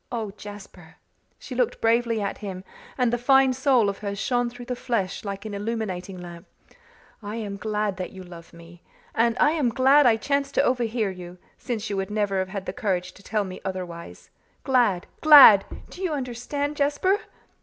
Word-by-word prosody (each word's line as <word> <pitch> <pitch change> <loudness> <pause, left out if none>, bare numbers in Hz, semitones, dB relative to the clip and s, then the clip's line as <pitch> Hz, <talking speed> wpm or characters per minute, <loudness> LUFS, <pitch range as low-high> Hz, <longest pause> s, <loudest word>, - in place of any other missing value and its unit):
Oh, 225 -4 -3
Jasper" 195 -5 -12 0.4
she - - -9
looked 250 -1 0
bravely 230 0 +1
at 200 - -3
him 190 -3 -7 0.3
and 245 -2 +1
the 240 - 0
fine 265 +1 +4
soul 255 -4 +3
of 200 0 -3
her 200 -1 -4
shone 245 +4 0
through 245 0 -11
the 250 0 -3
flesh 220 -6 -2
like 200 0 -6
an 215 - -6
illuminating 200 -3 -4
lamp 175 -1 -10 0.7
"I 205 +1 -6
am 210 -3 -5
glad 210 -1 -2
that 185 - -4
you 190 -1 -10
love 170 -2 -13
me! 170 +1 -15 0.3
and 230 +1 +1
I 300 - +5
am 300 -6 +1
glad 265 +3 +5
I 225 -2 +4
chanced 280 +3 -1
to - - +4
overhear 235 -4 0
you, 180 -1 -10 0.2
since 230 -4 -4
you 200 - -2
would 195 0 -2
never 205 -2 -1
have 185 0 -2
had 195 -1 -6
the - - -4
courage 185 -3 -2
to - - -17
tell 210 +1 -1
me 185 -1 -8
otherwise. 180 -3 -7 0.3
Glad 240 -9 +2 0.2
glad! 285 -10 +9 0.3
Do 365 - -10
you 360 -4 -1
understand, 285 +2 -4
Jasper?" 295 +8 +1
215 Hz, 185 wpm, -24 LUFS, 190-250 Hz, 0.7 s, glad